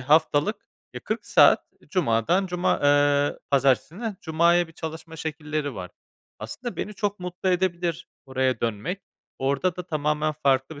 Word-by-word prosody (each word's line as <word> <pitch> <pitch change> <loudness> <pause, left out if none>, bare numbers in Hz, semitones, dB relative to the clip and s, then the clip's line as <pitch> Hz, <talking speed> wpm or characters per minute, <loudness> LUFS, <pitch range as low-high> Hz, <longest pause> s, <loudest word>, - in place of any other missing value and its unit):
haftalık, 155 - +3 0.4
eee, - - -5
40 - - -4
saat - - +6 0.3
cumadan 175 - +2
cuma 180 0 0
eee, 145 0 +3
pazartesinden 150 - +1
cumaya 170 +1 +3
bir - - -15
çalışma 160 +1 -7
şekilleri 150 -3 -3
var. 90 -1 -7 0.5
Aslında 235 - -6
beni 210 - -4
çok 200 0 -2
mutlu 180 +1 -3
edebilir 175 -2 0 0.2
oraya 130 -1 0
dönmek. 120 - -2 0.4
Orada 140 +7 0
da 180 -1 -6
tamamen 150 0 0
farklı 135 +2 +2
bir 145 - -10
155 Hz, 140 wpm, -25 LUFS, 140-180 Hz, 0.5 s, saat